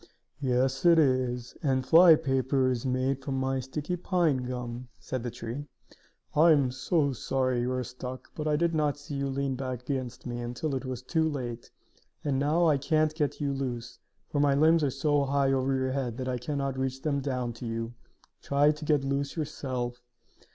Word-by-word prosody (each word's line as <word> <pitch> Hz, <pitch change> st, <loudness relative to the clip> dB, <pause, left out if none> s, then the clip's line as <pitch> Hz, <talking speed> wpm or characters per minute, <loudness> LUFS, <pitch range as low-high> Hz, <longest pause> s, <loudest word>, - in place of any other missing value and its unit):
"Yes, 130 Hz, 0 st, +1 dB
it 170 Hz, -1 st, +6 dB
is; 130 Hz, -4 st, +1 dB
and 130 Hz, -3 st, +1 dB
flypaper 140 Hz, -6 st, +5 dB
is 125 Hz, +1 st, -2 dB
made 130 Hz, +1 st, 0 dB
from 135 Hz, -1 st, -3 dB
my 130 Hz, 0 st, 0 dB
sticky 145 Hz, +7 st, -3 dB
pine 175 Hz, -5 st, +1 dB
gum," 125 Hz, -1 st, -5 dB
said 130 Hz, -, -4 dB
the 120 Hz, -, -3 dB
tree. 120 Hz, +5 st, -6 dB, 0.7 s
"I 165 Hz, +3 st, +6 dB
am 140 Hz, -4 st, +2 dB
so 140 Hz, +2 st, +1 dB
sorry 130 Hz, 0 st, 0 dB
you 125 Hz, +1 st, -1 dB
are 130 Hz, 0 st, -1 dB
stuck, 125 Hz, +1 st, -8 dB
but 155 Hz, -1 st, -4 dB
I 150 Hz, -, +2 dB
did 170 Hz, +2 st, +1 dB
not 150 Hz, -2 st, +1 dB
see 145 Hz, 0 st, -9 dB
you 140 Hz, 0 st, -1 dB
lean 135 Hz, 0 st, -1 dB
back 130 Hz, -2 st, -4 dB
against 125 Hz, -2 st, -4 dB
me 120 Hz, -1 st, -4 dB
until 120 Hz, +5 st, -3 dB
it 135 Hz, 0 st, -3 dB
was 130 Hz, -1 st, -5 dB
too 160 Hz, +4 st, +1 dB
late. 120 Hz, -5 st, -5 dB, 0.5 s
And 140 Hz, -3 st, 0 dB
now 155 Hz, +5 st, +2 dB
I 150 Hz, -4 st, +4 dB
can't 155 Hz, +2 st, +2 dB
get 150 Hz, -3 st, -1 dB
you 140 Hz, -1 st, 0 dB
loose, 120 Hz, -3 st, -4 dB, 0.3 s
for 145 Hz, -, -2 dB
my 145 Hz, -1 st, +4 dB
limbs 160 Hz, +2 st, +4 dB
are 145 Hz, -, +2 dB
so 145 Hz, +2 st, +1 dB
high 135 Hz, 0 st, +2 dB
over 135 Hz, 0 st, +1 dB
your 130 Hz, 0 st, 0 dB
head 130 Hz, -4 st, -2 dB
that 130 Hz, -1 st, -4 dB
I 125 Hz, -1 st, -1 dB
can 145 Hz, +4 st, -3 dB
not 135 Hz, -1 st, -2 dB
reach 130 Hz, 0 st, -2 dB
them 145 Hz, -2 st, +1 dB
down 125 Hz, -3 st, -2 dB
to 115 Hz, +1 st, -7 dB
you. 115 Hz, +1 st, -3 dB, 0.5 s
Try 145 Hz, +1 st, +3 dB
to 150 Hz, 0 st, -7 dB
get 150 Hz, -2 st, +2 dB
loose 140 Hz, +1 st, -1 dB
yourself." 125 Hz, -5 st, -3 dB
135 Hz, 195 wpm, -28 LUFS, 125-145 Hz, 0.7 s, it